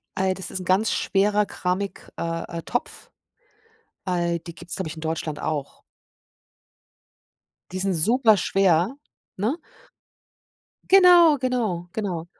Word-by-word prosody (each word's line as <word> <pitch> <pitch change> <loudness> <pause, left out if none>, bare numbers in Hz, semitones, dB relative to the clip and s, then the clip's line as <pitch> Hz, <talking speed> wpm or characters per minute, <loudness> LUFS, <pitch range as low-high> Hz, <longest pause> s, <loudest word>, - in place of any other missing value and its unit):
äh, 190 0 +1
das 190 0 -7
ist 185 -1 -5
ganz 195 +4 +2
schwerer 205 +1 +1
Keramik 190 +2 -4
äh, 165 0 -4
äh, - - -4
Topf. 245 - -4 1.0
Al 175 -2 0
die 170 0 -11
gibt's, 175 0 -8
glaube 190 -4 -3
ich, 155 - -7
in - - -8
Deutschland 160 -2 -3
auch. 150 -3 -4 1.9
Die 185 - -4
sind 195 0 0
super 220 +5 +4
schwer, 190 +5 +2 0.4
ne? 220 +9 0 1.4
Genau, 355 -5 +7
genau, 225 -9 -2
genau. 185 -7 -3
190 Hz, 120 wpm, -24 LUFS, 170-220 Hz, 1.9 s, Genau